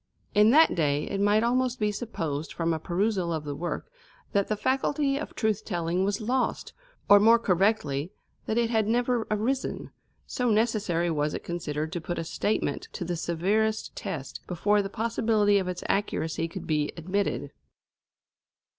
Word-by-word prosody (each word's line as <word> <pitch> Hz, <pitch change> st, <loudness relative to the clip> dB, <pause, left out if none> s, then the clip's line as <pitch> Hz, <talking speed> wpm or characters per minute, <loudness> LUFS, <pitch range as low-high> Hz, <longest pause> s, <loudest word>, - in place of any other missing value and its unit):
In 210 Hz, +1 st, +6 dB
that 315 Hz, +6 st, +6 dB
day 150 Hz, -3 st, +1 dB
it 200 Hz, 0 st, -3 dB
might 205 Hz, +2 st, +3 dB
almost 250 Hz, +1 st, +1 dB
be 210 Hz, -1 st, +1 dB
supposed 165 Hz, -, -4 dB
from 165 Hz, -1 st, 0 dB
a 160 Hz, -, -2 dB
perusal 185 Hz, +1 st, 0 dB
of 160 Hz, -2 st, -2 dB
the 145 Hz, -1 st, -4 dB
work 170 Hz, -, -4 dB, 0.4 s
that 200 Hz, -1 st, +1 dB
the 215 Hz, -, 0 dB
faculty 275 Hz, +3 st, +1 dB
of -, -, -7 dB
truth 215 Hz, -1 st, 0 dB
telling 175 Hz, -1 st, -1 dB
was 200 Hz, +1 st, 0 dB
lost, 245 Hz, +3 st, -1 dB, 0.3 s
or 205 Hz, -, +8 dB
more 225 Hz, +3 st, +6 dB
correctly 180 Hz, -7 st, +1 dB, 0.4 s
that 220 Hz, -, 0 dB
it 235 Hz, -1 st, +2 dB
had 220 Hz, -2 st, +2 dB
never 240 Hz, 0 st, +1 dB
arisen, 230 Hz, +6 st, -2 dB, 0.3 s
so 250 Hz, -1 st, -1 dB
necessary 210 Hz, -6 st, +1 dB
was 150 Hz, -1 st, 0 dB
it -, -, -6 dB
considered 160 Hz, -2 st, -3 dB
to 175 Hz, -, -3 dB
put 175 Hz, +2 st, -4 dB
a 165 Hz, -, -2 dB
statement 205 Hz, +6 st, -1 dB
to 180 Hz, -, -4 dB
the 175 Hz, +1 st, -2 dB
severest 200 Hz, +7 st, 0 dB
test 135 Hz, -4 st, -5 dB
before 205 Hz, +4 st, +2 dB
the 195 Hz, -, -4 dB
possibility 220 Hz, -2 st, +2 dB
of 185 Hz, -, -3 dB
its 180 Hz, -1 st, -4 dB
accuracy 165 Hz, -5 st, -1 dB
could 165 Hz, -, -8 dB
be 150 Hz, -2 st, 0 dB
admitted. 185 Hz, +4 st, -2 dB
200 Hz, 165 wpm, -27 LUFS, 170-225 Hz, 0.4 s, or